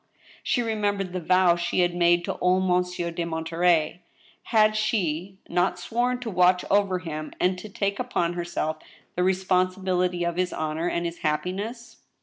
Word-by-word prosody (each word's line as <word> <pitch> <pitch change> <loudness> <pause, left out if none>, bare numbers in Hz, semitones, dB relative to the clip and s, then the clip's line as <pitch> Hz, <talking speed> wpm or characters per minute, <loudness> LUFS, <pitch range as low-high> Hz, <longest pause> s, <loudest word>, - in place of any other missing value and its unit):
She 245 - 0
remembered 205 -4 -1
the 185 - -2
vow 180 0 +4
she 175 +1 0
had 175 -1 +2
made 175 0 +3
to - - -4
old 185 +1 +3
Monsieur 180 -1 0
de 170 +1 -3
Monterey. 165 0 +1 0.4
Had 215 -2 +3
she 190 -4 -1
not 180 +1 +1
sworn 240 +7 -1
to 240 - -4
watch 180 0 +3
over 200 -2 +3
him, 155 -4 -6
and 185 +1 +2
to 215 - -9
take 200 0 -2
upon 175 -9 -1
herself 170 -2 -2 0.4
the 180 - 0
responsibility 185 -1 +1
of 170 0 -2
his 185 0 0
honor 155 +2 -2
and 170 0 -2
his 170 0 -4
happiness 200 +10 -3
180 Hz, 160 wpm, -25 LUFS, 170-195 Hz, 0.4 s, vow